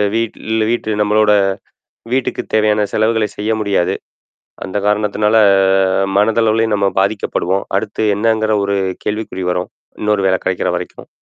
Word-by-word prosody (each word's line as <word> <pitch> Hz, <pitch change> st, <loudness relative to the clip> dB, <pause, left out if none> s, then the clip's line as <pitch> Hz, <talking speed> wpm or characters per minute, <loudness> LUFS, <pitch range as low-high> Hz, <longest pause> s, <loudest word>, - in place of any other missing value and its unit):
வீட்டில 110 Hz, -1 st, -1 dB
வீட்டு 120 Hz, -2 st, -2 dB
நம்மளோட 105 Hz, 0 st, +3 dB, 0.8 s
வீட்டுக்குத் 130 Hz, -1 st, -2 dB
தேவையான 105 Hz, -1 st, +2 dB
செலவுகள 110 Hz, 0 st, +1 dB
செய்ய 105 Hz, +2 st, -1 dB
முடியாது. 100 Hz, -4 st, 0 dB, 0.7 s
அந்த 95 Hz, +1 st, -5 dB
காரணத்தினால 105 Hz, +1 st, +1 dB, 0.8 s
மனதளவிலயும் 110 Hz, +1 st, +2 dB
நம்ம 100 Hz, -1 st, +1 dB
பாதிக்கப்படுவோம். 100 Hz, -2 st, -1 dB
அடுத்து 110 Hz, +1 st, -2 dB
என்னங்கிற 110 Hz, 0 st, +1 dB
ஒரு 100 Hz, 0 st, 0 dB, 0.3 s
கேள்விக்குறி 105 Hz, -3 st, -3 dB
வரும் 90 Hz, 0 st, -3 dB, 0.3 s
இன்னொரு 105 Hz, -2 st, +1 dB
வேல 95 Hz, 0 st, +2 dB
கெடைக்கிற 95 Hz, -1 st, 0 dB
வரைக்கும். 90 Hz, -, -8 dB
105 Hz, 120 wpm, -16 LUFS, 100-110 Hz, 0.8 s, நம்மளோட